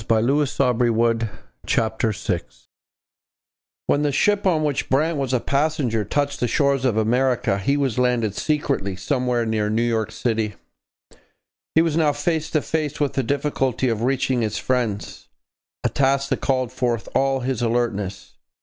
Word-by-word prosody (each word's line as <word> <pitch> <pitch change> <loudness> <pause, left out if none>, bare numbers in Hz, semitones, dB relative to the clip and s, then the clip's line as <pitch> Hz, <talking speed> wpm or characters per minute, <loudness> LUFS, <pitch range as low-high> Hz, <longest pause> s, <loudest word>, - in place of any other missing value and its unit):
CHAPTER 120 +7 +2
VI 125 -2 +2
BRANT 120 -1 +1
MEETS 115 -2 -1
HERKIMER 110 -1 0 1.4
When 145 - +2
the 145 -1 +1
ship 200 +8 +2
on 160 -4 +2
which 145 -3 -1
Brant 155 +4 +2
was 135 -2 -1
a 130 - +2
passenger 140 -5 0
touched 145 +4 -1
the 120 - +1
shores 140 0 +1
of 115 -4 +1
America, 120 -1 +1
he 140 +9 +1
was 135 -4 0
landed 120 -5 +1
secretly 140 -9 -1
somewhere 125 +1 0
near 110 -1 0
New 110 +2 +1
York 110 -2 0
city. 110 -3 -1 1.2
He 160 - +6
was 165 -3 0
now 155 -3 +3
face 160 +1 -1
to 155 - 0
face 150 -2 -2
with 145 -2 0
the 135 - +1
difficulty 135 -1 0
of 115 -2 -1
reaching 130 0 +1
his 110 -2 -1
friends 120 -6 -2 0.6
a - - +2
task 140 0 +1
that - - -1
called 130 -3 0
forth 120 -3 -1
all 135 -1 +1
his 125 -2 -2
alertness. 115 -5 -2
125 Hz, 160 wpm, -22 LUFS, 115-140 Hz, 1.4 s, He